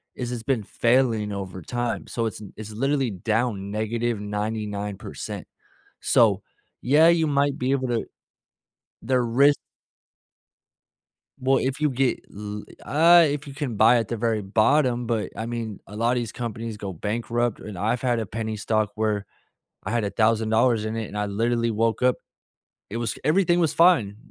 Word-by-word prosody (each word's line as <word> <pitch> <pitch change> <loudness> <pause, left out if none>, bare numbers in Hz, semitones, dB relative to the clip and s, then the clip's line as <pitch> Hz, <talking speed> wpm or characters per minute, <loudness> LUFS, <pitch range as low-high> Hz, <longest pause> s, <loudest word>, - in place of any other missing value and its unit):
is 125 -1 -4
it's 120 -2 -5
been 125 -5 0
failing 115 -3 +1
over 95 -2 -6
time, 120 +5 -3
so 115 - -2
it's 110 -1 -4
it's 110 0 -8
literally 135 +2 0
down 105 0 -1
-99%, 105 -2 -3 0.6
so, - - +4 0.4
yeah, 150 +6 +5
you 170 -2 +4
might 140 0 +1
be 130 +2 -1
able 130 -2 0
to 120 -2 0 1.0
the 125 +2 +1
risk 135 +5 +4 1.8
Well, 135 +1 +3
if 135 +3 -2
you 150 - +3
get 130 0 0
l 105 0 -6 0.2
uh, 170 +3 +6
if 145 +1 -3
you 140 - -8
can 135 -5 -4
buy 120 +4 +6
at 115 -3 -1
the 120 - -3
very 110 -1 0
bottom, 120 +4 +2
but 115 -3 -1
I 115 - -4
mean, 115 -3 -4
a 105 - -11
lotta 120 +3 +1
these 115 -2 -4
companies 115 -2 -5
go 100 -2 -5
bankrupt, 115 +5 -2
and 105 -4 -8
I've 115 +5 0
had 120 -3 +1
a 110 - -2
penny 110 +2 -4
stock 110 0 0
where 105 -2 -1 0.6
I - - -4
had 120 -3 0
$1,000 110 +2 +2
in 110 +1 -3
it, 110 -2 -3
and 105 - -7
I 105 - 0
literally 115 +3 0
woke 115 +2 0
up 125 0 +4 0.8
it 110 - -4
was 115 -3 -2
everything 175 +2 +3
was 165 -3 +1
fine. 150 - +4
115 Hz, 165 wpm, -24 LUFS, 105-130 Hz, 1.8 s, uh